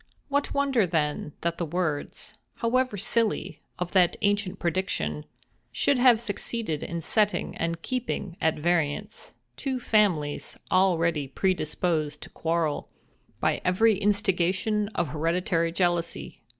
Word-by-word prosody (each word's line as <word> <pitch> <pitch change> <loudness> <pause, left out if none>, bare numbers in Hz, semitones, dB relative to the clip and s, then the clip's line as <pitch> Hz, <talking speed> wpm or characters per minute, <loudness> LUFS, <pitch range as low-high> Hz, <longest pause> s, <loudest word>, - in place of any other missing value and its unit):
What 285 0 0
wonder 270 -8 +2
then, 150 -3 -1
that 170 0 -1
the - - 0
words, 160 -3 -3 0.2
however 250 -1 +1
silly, 225 +3 0 0.2
of 180 -1 -3
that 180 -3 +4 0.4
prediction, 80 - -2 0.5
should 260 - +2
have 245 -3 +6
succeeded 215 -6 -3
in 170 -1 -4
setting 210 +3 +1
and 165 0 -2
keeping 245 -8 -3
at 160 - +2
variance 170 +4 -1 0.2
two 265 -2 -2
families 185 -11 +1
already 170 -6 +2
predisposed 155 -1 -1
to - - -9
quarrel 165 -2 -1 0.5
by - - +1
every 215 +4 +4
instigation 205 0 +1
of 170 -3 0
hereditary 165 +2 0
jealousy? 175 -1 -1
180 Hz, 115 wpm, -27 LUFS, 165-210 Hz, 0.5 s, have